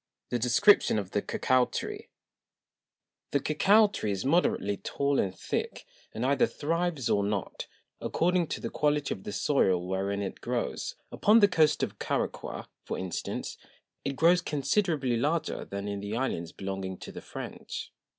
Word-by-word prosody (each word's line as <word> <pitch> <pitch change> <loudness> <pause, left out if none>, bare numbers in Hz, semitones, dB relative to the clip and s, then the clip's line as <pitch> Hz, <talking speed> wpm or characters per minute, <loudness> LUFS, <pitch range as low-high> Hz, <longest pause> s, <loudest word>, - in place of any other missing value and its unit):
The 120 - +1
Description 125 - +5
of 100 -3 -3
the 105 - +1
Cocao 130 +3 +2
Tree. - - -5 1.2
The 140 - +2
Cocao 200 +10 +5
Tree 105 - -2
is 100 +2 -2
moderately 130 - +2
tall 140 +5 0
and 95 -1 -1
thick, - - -3 0.3
and 115 +3 -3
either 140 +1 +3
thrives, 165 -3 -1
or 100 - +2
not, 100 -2 -3 0.3
according 175 0 +1
to - - -3
the - - -5
Quality 150 -1 +1
of 95 - -11
the - - -4
Soil 95 -8 +2
wherein 100 +2 -1
it 95 - -6
grows: - - -2 0.2
Upon 215 +2 +5
the 205 - +7
Coast 160 -5 +3
of - - -3
Caraqua, - - -3 0.2
for - - -4
instance, 95 -2 -4 0.4
it 140 - -2
grows 170 +4 +5
considerably 145 - 0
larger 155 +6 -1
than 100 +1 -5
in 100 -1 -3
the 100 +2 -4
Islands 85 -10 -2
belonging 95 -1 -5
to - - -9
the - - -8
French. - - -7
130 Hz, 160 wpm, -29 LUFS, 100-160 Hz, 1.2 s, the